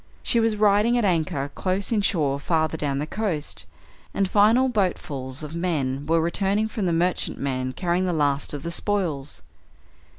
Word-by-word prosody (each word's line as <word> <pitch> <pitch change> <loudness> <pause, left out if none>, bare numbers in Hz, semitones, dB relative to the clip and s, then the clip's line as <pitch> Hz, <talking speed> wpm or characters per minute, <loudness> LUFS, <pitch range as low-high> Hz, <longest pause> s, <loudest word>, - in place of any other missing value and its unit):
She 235 - +2
was 225 -1 +2
riding 210 +3 +3
at 235 - +1
anchor 155 -6 0
close 190 +2 -2
inshore 165 -10 +1
farther 160 +1 0
down 145 -3 -2
the 145 - -1
coast, 170 -4 -3 0.5
and 195 - +2
final 220 +7 +4
boatfuls 150 - -2
of 150 +1 -7
men 145 -6 -1
were 165 +1 +3
returning 195 +6 0
from 215 -3 -2
the - - +1
merchantman 140 -7 -1
carrying 180 +3 0
the - - +1
last 145 -3 0
of 145 -1 -4
the 170 - -4
spoils. 170 -8 -1
170 Hz, 160 wpm, -24 LUFS, 145-205 Hz, 0.5 s, final